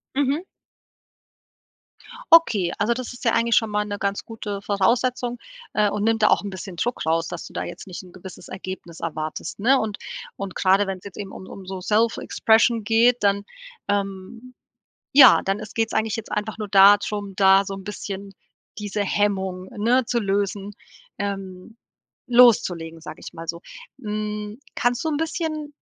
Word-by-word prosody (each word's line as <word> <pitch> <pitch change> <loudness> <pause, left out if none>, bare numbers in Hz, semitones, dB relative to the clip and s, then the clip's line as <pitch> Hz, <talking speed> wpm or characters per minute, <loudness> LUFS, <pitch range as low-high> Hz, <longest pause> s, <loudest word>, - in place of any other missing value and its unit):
Mhm. 285 +4 +1 1.9
Okay, 215 - +5
also, 235 +3 +2
das 255 0 -6
ist 245 - -11
ja 230 - +3
eigentlich 230 -1 +2
schon 225 -2 +3
mal 210 0 0
'ne 205 -1 -4
ganz 200 0 -2
gute 210 -3 -6
Voraussetzung, 240 +5 0 0.4
äh, 210 -1 +3
und 205 +1 -2
nimmt 225 0 +1
da - - +6
auch - - +4
'n 200 - -4
bisschen 190 0 -8
Druck 240 +1 -2
raus, 165 +1 +1
dass - - -6
du - - -12
da - - -3
jetzt 175 +2 -8
nicht 180 - -7
'n 180 - -15
gewisses 185 +1 -11
Ergebnis 185 -3 -8
erwartest, 155 +1 -5
ne? 260 +6 +4
Und 215 -2 -3 0.4
und 195 -2 -6
gerade, 195 +1 +3
wenn's 190 -1 -5
jetzt 200 - -10
eben 200 -2 -6
um 190 - -10
um 195 - -10
so 185 0 -6
Self-Expression 225 +1 +2
geht, 230 +3 +4
dann, 200 0 +2 0.4
ähm, 200 +5 -4 0.6
ja, 270 -1 +9
dann 195 +1 0
ist 215 -1 -9
geht's 225 0 0
eigentlich 220 -1 0
jetzt 225 - -8
einfach 210 +1 -3
nur 210 -2 -4
da 200 +1 +8
drum, 205 -1 -5
da 195 0 +6
so 195 0 -5
'n 195 - -9
bisschen 200 -1 -6 0.5
diese 205 -1 -3
Hemmung, 190 -2 -1
ne, 240 +5 +2
zu 235 +1 0
lösen, 200 0 -1 0.5
ähm, 195 +1 -5 0.5
loszulegen, 190 -10 +4
sage - - -9
ich - - -8
mal 165 0 -8
so. 170 +1 -4 0.4
Hm, 210 -1 -4 0.2
kannst 245 +4 0
du - - 0
'n 295 - -1
bisschen 310 -2 -3
205 Hz, 175 wpm, -23 LUFS, 195-230 Hz, 1.9 s, ja